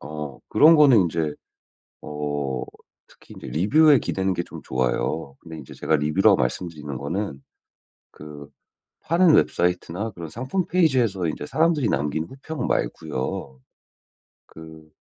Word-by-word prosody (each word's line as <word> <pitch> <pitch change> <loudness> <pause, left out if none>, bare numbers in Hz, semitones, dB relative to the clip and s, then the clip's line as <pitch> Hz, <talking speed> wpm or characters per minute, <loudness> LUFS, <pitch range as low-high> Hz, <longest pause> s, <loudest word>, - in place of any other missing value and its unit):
어 75 -1 -7
그런 160 +2 +6
거는 140 -7 +6
인제 80 -3 -2 0.7
어 75 -3 -4 0.5
특히 - - -18
인제 - - -10
리뷰에 135 - +4
기대는 95 -3 -2
게 85 - -2
좀 - - -11
좋아요. 65 +3 -2
근데 80 -2 -10
이제 70 - -11
제가 80 - 0
리뷰라고 75 +1 +3
말씀드리는 75 +2 -3
거는 70 -1 -4 0.7
그 75 -1 -11 0.5
파는 170 -2 +4
웹사이트나 90 +4 0
그런 85 -4 -9
상품 130 - -3
페이지에서 125 - +1
이제 75 - -4
사람들이 155 - +1
남긴 75 +4 -1
후평 135 - -6
말고요. 65 0 -3 0.9
그 80 -1 -14
80 Hz, 285 characters per minute, -23 LUFS, 75-115 Hz, 0.9 s, 그런